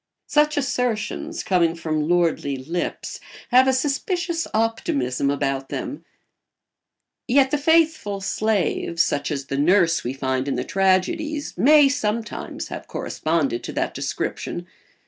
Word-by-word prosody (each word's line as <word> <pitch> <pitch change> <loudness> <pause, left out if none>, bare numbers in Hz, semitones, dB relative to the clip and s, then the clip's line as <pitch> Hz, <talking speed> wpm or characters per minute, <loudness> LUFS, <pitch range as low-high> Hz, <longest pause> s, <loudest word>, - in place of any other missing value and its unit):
Such 300 +1 +2
assertions, 260 +5 -2
coming 170 -3 +2
from 155 -2 -2
lordly 165 -5 +1
lips, 165 +7 -4 0.3
have 255 +2 +6
a - - +5
suspicious 330 - -1
optimism 140 - 0
about 135 -1 -1
them; 285 - -5 1.2
yet 265 +1 +4
the 295 - +2
faithful 310 -9 +2
slave, 195 -4 -1
such 145 -3 +1
as 140 -3 -3
the 140 0 -3
nurse 170 +1 +3
we 125 - -3
find 130 0 -2
in 135 - 0
the 125 - -1
tragedies, 290 - 0
may 295 +1 +6
sometimes 230 -4 -3
have - - -7
corresponded 155 -7 -1
to - - -6
that - - -1
description. 175 - -4
195 Hz, 125 wpm, -23 LUFS, -, 1.2 s, have